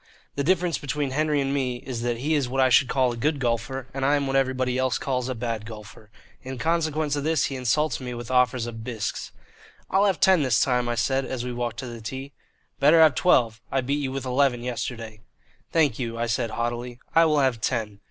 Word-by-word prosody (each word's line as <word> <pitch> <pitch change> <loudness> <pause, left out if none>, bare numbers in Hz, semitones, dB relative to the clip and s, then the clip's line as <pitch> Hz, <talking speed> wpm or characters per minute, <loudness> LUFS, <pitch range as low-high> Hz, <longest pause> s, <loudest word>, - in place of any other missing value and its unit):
The 140 - -2
difference 175 +1 +1
between 145 -1 -2
Henry 150 +1 +1
and 135 0 -1
me 130 -3 -1
is 125 -3 -4
that 120 -1 -1
he 145 +6 -1
is 140 -5 +1
what 135 +1 -2
I 130 -1 +5
should 125 +1 +5
call 130 -2 +2
a - - -5
good 145 +5 0
golfer, 120 +1 -2
and 135 0 -3
I 140 +2 +3
am 140 -1 0
what 135 0 -2
everybody 130 -2 +1
else 130 -2 +1
calls 130 -1 -2
a 130 - -2
bad 115 -2 -3
golfer. 105 -1 -11 0.3
In 130 0 -7
consequence 155 -1 0
of 145 - -2
this 160 -2 +2
he 135 - -3
insults 130 +2 0
me 125 -2 -6
with 120 +1 -7
offers 125 -1 +2
of 115 -1 -7
bisques. 115 -3 -4 0.6
"I'll 195 +2 +4
have 195 -4 +1
ten 190 -4 +5
this 130 -5 +2
time," 125 -2 +1
I 120 - 0
said, 135 +4 +1
as 125 -2 -4
we 125 - -4
walked 120 -1 -3
to - - -6
the 120 -2 -8
tee. 135 +5 -6 0.5
"Better 150 +4 +6
have 160 -3 +7
twelve. 120 -8 +2
I 135 - +1
beat 140 +3 -1
you 135 -2 -2
with 135 0 -4
eleven 130 -1 +1
yesterday." 115 -3 -5 0.5
"Thank 150 -8 +2
you," 115 -2 -3
I 115 - 0
said 115 0 -1
haughtily, 120 +2 -3 0.2
"I 165 0 +6
will 150 -2 +3
have 130 -4 +1
ten." 110 -4 -2
130 Hz, 230 wpm, -25 LUFS, 120-140 Hz, 0.6 s, have